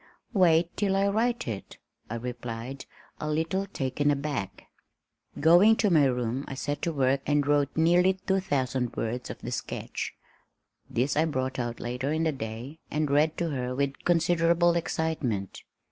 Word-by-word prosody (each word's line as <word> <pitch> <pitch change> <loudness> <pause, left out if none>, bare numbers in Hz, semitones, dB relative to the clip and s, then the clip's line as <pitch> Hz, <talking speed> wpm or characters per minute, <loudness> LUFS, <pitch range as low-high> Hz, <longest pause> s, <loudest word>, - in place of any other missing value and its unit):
"Wait 170 -4 +3
till 195 -2 +1
I 195 +1 +3
write 230 - 0
it," 105 -4 -6 0.3
I 115 - -3
replied, 120 +2 -6 0.3
a 155 - -3
little 165 +6 0
taken 145 -4 -1
aback. 140 -8 -2 0.8
Going 175 +8 +6
to 210 -3 +2
my 155 -4 +5
room 125 0 -1
I 135 - -5
set 145 +2 -3
to 170 - 0
work 135 -2 +1
and 145 -1 +2
wrote 145 0 +1
nearly 175 +3 +4
two 190 +1 -1
thousand 130 -8 -1
words 120 +2 -3
of - - -6
the - - -5
sketch. - - -4 0.7
This 130 +4 0
I 155 +2 +3
brought 130 -4 -2
out 120 -1 -3
later 125 +4 -3
in 160 +1 0
the 160 - +2
day 125 +4 -6
and 150 -1 -1
read 155 +2 +3
to 170 -2 -1
her 125 -2 -2
with 140 0 -2
considerable 170 0 +3
excitement. 155 - -2
145 Hz, 160 wpm, -28 LUFS, 130-170 Hz, 0.8 s, Going